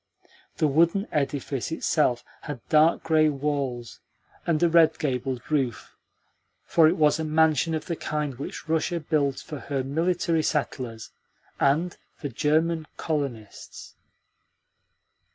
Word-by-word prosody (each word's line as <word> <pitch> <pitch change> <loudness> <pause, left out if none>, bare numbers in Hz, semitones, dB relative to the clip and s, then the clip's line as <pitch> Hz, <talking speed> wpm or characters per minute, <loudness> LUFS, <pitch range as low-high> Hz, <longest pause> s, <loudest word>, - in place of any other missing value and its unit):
The - - +2
wooden 170 +8 +2
edifice 140 -1 -2
itself 145 -6 +1 0.2
had 140 -6 -8
dark 155 +2 +4
grey 155 -1 +4
walls 135 -5 -3 0.5
and 165 -1 +2
a - - +6
red 165 -1 +4
gabled 130 -4 -2
roof, 130 -8 -1 0.7
for 165 -2 +4
it 170 - +2
was 150 0 +3
a - - -1
mansion 160 0 +2
of 155 - -4
the 170 - -3
kind 150 -3 -3
which 145 - -7
Russia 160 +2 0
builds 145 -4 0
for 150 - -7
her 135 -1 -3
military 165 +3 0
settlers 130 -7 -3 0.5
and 160 +6 +2 0.2
for 145 - -5
German 155 +5 +1
colonists. 140 -9 -5
150 Hz, 125 wpm, -26 LUFS, 135-160 Hz, 0.7 s, a